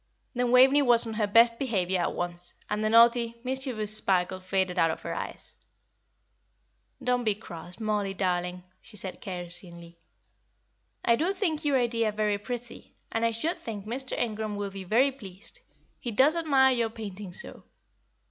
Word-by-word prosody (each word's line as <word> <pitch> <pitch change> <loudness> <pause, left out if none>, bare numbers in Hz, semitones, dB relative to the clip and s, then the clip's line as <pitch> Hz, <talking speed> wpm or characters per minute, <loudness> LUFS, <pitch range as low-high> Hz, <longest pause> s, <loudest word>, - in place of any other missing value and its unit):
Then 245 -1 0
Waveney 265 +3 +6
was 240 -3 +5
on 225 - -5
her 215 -1 0
best 230 +2 +5
behaviour 190 -8 0
at - - -1
once, 175 0 -3 0.2
and 210 +1 -1
the 215 - +2
naughty, 235 +1 +4
mischievous 250 -5 0
sparkle 185 -2 +1
faded 185 -1 -1
out 165 - +4
of 160 - -4
her - - -4
eyes. - - -6 1.5
"Don't 250 0 +1
be 215 -3 +1
cross, 175 -3 -9
Mollie 210 -3 -1
darling," 180 -1 -1 0.2
she 210 - -14
said 190 -1 -7
caressingly. 170 -2 -8 1.1
"I 235 - +5
do 335 +9 0
think 340 -6 -1
your 285 -2 +2
idea 230 -3 +1
very 210 -1 0
pretty, 240 +2 -7 0.2
and 225 - -1
I 230 - +4
should 270 +10 -2
think 210 -3 -7
Mr. 255 +4 -3
Ingram 215 -2 -2
will 205 -1 -4
be 195 0 -7
very 245 +9 +3
pleased, 195 -7 -11 0.4
he 240 - -4
does 265 +8 +4
admire 275 -5 +4
your 235 -2 0
painting 210 -4 -8
so. - - -7
215 Hz, 165 wpm, -28 LUFS, 190-245 Hz, 1.5 s, Waveney